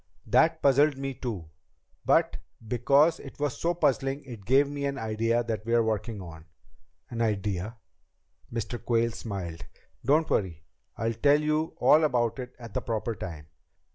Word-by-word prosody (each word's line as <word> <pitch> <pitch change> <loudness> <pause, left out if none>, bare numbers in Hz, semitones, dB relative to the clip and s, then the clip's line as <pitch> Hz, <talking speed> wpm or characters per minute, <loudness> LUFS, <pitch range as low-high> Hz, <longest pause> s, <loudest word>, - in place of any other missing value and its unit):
"That - - +3
puzzled 140 +1 +4
me, 135 0 -3
too. 105 -12 -6 0.5
But - - +3 0.3
because 140 +8 +3
it 135 - -11
was 145 -3 -2
so 170 +1 +1
puzzling 135 -2 0
it 115 -7 -10
gave 135 +3 +5
me 145 0 -4
an 140 0 -2
idea 115 +1 0
that 110 -2 -3
we're 115 +1 +2
working 110 0 -2
on." 80 -2 -11 0.7
"An 115 -1 -3
idea?" 105 0 -1 0.7
Mr. 115 +1 -4
Quayle 115 -1 +2
smiled. 95 -7 -6 0.4
"Don't 155 +5 +3
worry. 85 -6 -1 0.3
I'll 115 +1 -1
tell 145 +6 +4
you 155 +1 0
all 155 +1 +6
about 120 -5 +1
it 125 0 -7
at 115 -4 -10
the - - -1
proper 115 0 -2
time. 85 -7 -7
120 Hz, 155 wpm, -28 LUFS, 110-140 Hz, 0.7 s, all